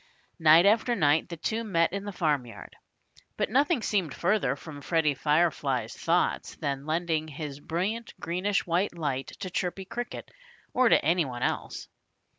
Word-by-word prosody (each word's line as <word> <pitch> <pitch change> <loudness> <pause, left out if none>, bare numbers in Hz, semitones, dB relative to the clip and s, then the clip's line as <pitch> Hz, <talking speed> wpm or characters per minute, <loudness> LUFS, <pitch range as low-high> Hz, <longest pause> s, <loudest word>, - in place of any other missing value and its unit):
Night 160 +2 +7
after 225 +4 +3
night 150 -4 +2
the 170 - -6
two 225 +8 -2
met 170 -6 +1
in 200 0 -4
the 205 - -4
farmyard. 145 -9 -2 0.6
But - - -1
nothing 280 0 +2
seemed 185 -9 0
further 175 -7 +1
from 145 0 -10
Freddie 160 -1 +1
Firefly's 145 -5 0
thoughts 170 +2 0
than 140 -2 -3
lending 160 -1 0
his 150 -2 -6
brilliant 195 +10 -3
greenish 190 +5 -1
white 175 +1 0
light 140 -5 -2
to 185 -3 -4
Chirpy 185 +1 -2
Cricket, 240 +5 -6 0.4
or 255 -1 +4
to - - +4
any 170 +2 +3
one 125 -2 -5
else. - - -3
170 Hz, 155 wpm, -28 LUFS, 150-200 Hz, 0.6 s, Night